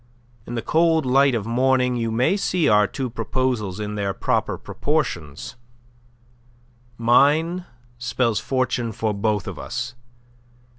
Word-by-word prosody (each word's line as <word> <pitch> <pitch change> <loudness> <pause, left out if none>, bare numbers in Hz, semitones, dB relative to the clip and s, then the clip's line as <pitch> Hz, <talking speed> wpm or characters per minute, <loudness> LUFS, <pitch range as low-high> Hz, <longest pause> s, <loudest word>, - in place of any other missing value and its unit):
In 120 - -5
the 115 - -3
cold 160 -2 +2
light 135 0 +4
of 105 -3 -2
morning 125 +1 +2
you 115 -1 -1
may 120 - +2
see 180 -5 +1
our 105 -3 +5
two 130 +7 -4
proposals 115 -4 -2
in 105 0 -4
their 100 -2 -2
proper - - 0
proportions. 85 - -3 1.4
Mine 150 +9 +3 0.3
spells 120 -2 0
fortune 125 -3 -1
for 110 +1 -1
both 105 -1 -1
of - - -6
us. 120 +1 -4
120 Hz, 130 wpm, -22 LUFS, 110-135 Hz, 1.4 s, our